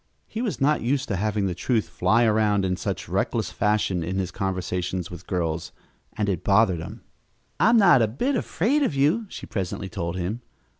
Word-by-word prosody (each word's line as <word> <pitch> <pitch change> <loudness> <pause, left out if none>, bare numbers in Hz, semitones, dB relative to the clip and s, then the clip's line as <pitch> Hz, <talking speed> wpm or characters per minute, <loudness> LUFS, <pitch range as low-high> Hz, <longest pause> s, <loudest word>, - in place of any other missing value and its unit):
He 225 - -5
was 230 -5 -2
not 145 +2 +2
used 135 +3 0
to 100 - 0
having 105 +1 0
the 95 - -1
truth 110 +5 0
fly 115 +2 +2
around 105 -3 +2
in 90 -1 0
such - - -4
reckless - - -1
fashion 105 -4 +1
in 90 +4 -3
his 95 -2 -2
conversations 90 -2 -3
with 90 - -10
girls, 85 -3 -2 0.5
and 105 -2 0
it 95 -5 -1
bothered 100 -3 +3
him. 80 - -8 0.6
"I'm 230 +2 +5
not 175 - +6
a 110 - +3
bit 245 - -1
afraid 245 - +1
of 220 - +1
you," 160 +12 +2
she - - -8
presently 95 -1 -4
told 85 0 -4
him. 95 +6 -3
105 Hz, 190 wpm, -25 LUFS, 90-135 Hz, 0.6 s, not